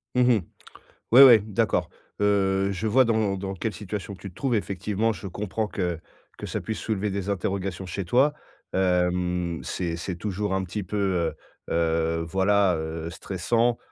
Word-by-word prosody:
Mmh 125 - +4
mh, 110 - +3 0.7
ouais, 130 +3 +11
ouais, 120 -5 +9
d'accord. 105 -1 0 0.3
Heu, 100 -1 +2
je 100 +3 -2
vois 130 +4 +5
dans 110 -4 +1
dans 95 0 -4
quelle 105 +4 -3
situation 105 0 -6
tu 100 - -9
te 90 - -20
trouves 125 +4 0
effectivement, 105 +2 -1
je 100 - -8
comprends 105 +3 -3
que 90 -5 -2 0.4
que - - -6
ça - - -3
puisse 110 - -4
soulever 105 -2 -1
des 100 0 -3
interrogations 95 -1 -2
chez 95 +2 -4
toi. 130 +11 +3 0.4
Hem, 90 -2 0
c'est 85 -3 -3
c'est 85 +2 -5
toujours 100 +1 -2
un 95 0 0
petit 100 +4 -4
peu, 105 +4 -4 0.7
heu, - - -2
heu, 80 0 +1
voilà, 95 +1 +3
heu, 80 +1 -4
stressant, 115 +8 0
95 Hz, 170 wpm, -25 LUFS, 90-105 Hz, 0.7 s, ouais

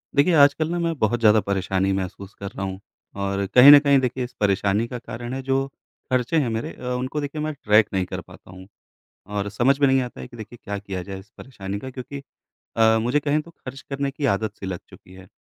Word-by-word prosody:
देखिए, 155 +6 +4
आजकल 150 +1 +4
ना 175 - -1
मैं 170 -1 0
बहुत 115 +2 +1
ज़्यादा 110 -1 +5
परेशानी 95 -1 0
महसूस 95 +1 -5
कर 100 - -7
रहा 100 - -6
हूँ। 95 0 -5 0.4
और 100 0 -2
कहीं 130 +3 +10
न 145 - +11
कहीं 140 -1 +4
देखिए 130 0 -2
इस 125 - -7
परेशानी 100 +2 +1
का 125 - -6
कारण 120 +1 -7
है 135 - -3
जो 135 +1 0 0.4
खर्चे 130 +5 +1
हैं 135 -5 0
मेरे, 115 0 -3
अ, - - -14 0.2
उनको 130 +4 -3
देखिए 145 +2 -4
मैं 155 0 -2
ट्रैक 105 -6 +3
नहीं 95 -1 0
कर - - -6
पाता - - -16
हूँ। 95 0 -12 0.6
और 100 0 -3
समझ 125 +7 +2
में 140 - +5
नहीं 135 0 +3
आता 125 -1 -7
है - - -8
कि 120 - -13
देखिए 110 +2 -10
क्या 100 0 -4
किया 95 -2 -5
जाए 95 +1 -7
इस 100 +3 -17
परेशानी 100 -6 -6
का 130 - -7
क्योंकि 135 +2 -8 0.5
अ, 110 0 +5
मुझे 125 +6 +1
कहें 150 +1 0
तो 170 +2 -15
खर्च 135 -4 -10
करने 140 0 -2
की 140 +1 -3
आदत-सी 100 0 -3
लग 95 -2 -4
चुकी 90 - -16
है। 95 0 -14
120 Hz, 235 wpm, -23 LUFS, 100-140 Hz, 0.6 s, न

